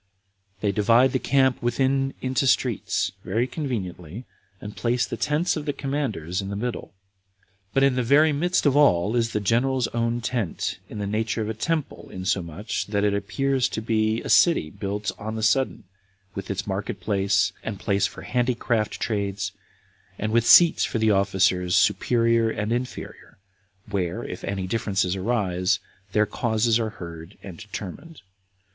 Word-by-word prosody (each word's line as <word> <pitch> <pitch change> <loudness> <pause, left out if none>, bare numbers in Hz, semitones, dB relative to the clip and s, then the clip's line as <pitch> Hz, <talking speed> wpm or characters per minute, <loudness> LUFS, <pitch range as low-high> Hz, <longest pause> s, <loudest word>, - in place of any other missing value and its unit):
They 105 - +1
divide 115 +5 +4
the 130 - 0
camp 130 -1 +2
within 135 +3 0
into 130 +1 0
streets, 120 -6 +1
very 110 +6 0
conveniently, 110 - -5 0.3
and 105 0 -8
place 120 +1 0
the - - -5
tents 150 +4 0
of 155 -1 -5
the 145 - 0
commanders 110 - -3
in 100 - -6
the 100 - -4
middle; 120 -1 -4 0.8
but 135 - +2
in 135 -1 +4
the 125 - +1
very 145 +5 +4
midst 175 +5 +1
of 145 -2 +4
all 105 -7 +4
is 115 -1 +1
the - - 0
general's 120 +5 +1
own 115 0 -1
tent, 115 -6 -2
in - - -8
the 100 - -3
nature 110 +2 -1
of 105 - -4
a - - -1
temple, 155 +7 -3
insomuch, 95 +2 -3
that 100 -1 0
it 105 -1 +2
appears 130 +6 0
to - - -3
be 110 0 0
a - - -6
city 165 - +4
built 100 +1 -3
on 110 +1 -5
the 110 - -3
sudden, 120 +2 +1 0.5
with 95 - -6
its 95 -1 -2
market 100 0 -3
place, 100 0 +1
and 105 -4 -5
place 100 0 +1
for - - -11
handicraft 120 -3 0
trades, 100 -2 -2 0.7
and 110 +1 -2
with 115 0 +2
seats 170 -2 +7
for - - -1
the 110 -1 +3
officers 95 -2 +2
superior 115 -1 +3
and 105 0 -3
inferior, 125 +1 -6 0.5
where, 90 -4 -2
if - - -7
any 100 -1 -3
differences 95 -2 0
arise, 95 -3 0 0.3
their 105 +1 +3
causes 110 +1 +1
are 110 -1 -1
heard 85 -3 -10
and 90 -4 -9
determined. 110 - -8
110 Hz, 165 wpm, -24 LUFS, 100-125 Hz, 0.8 s, seats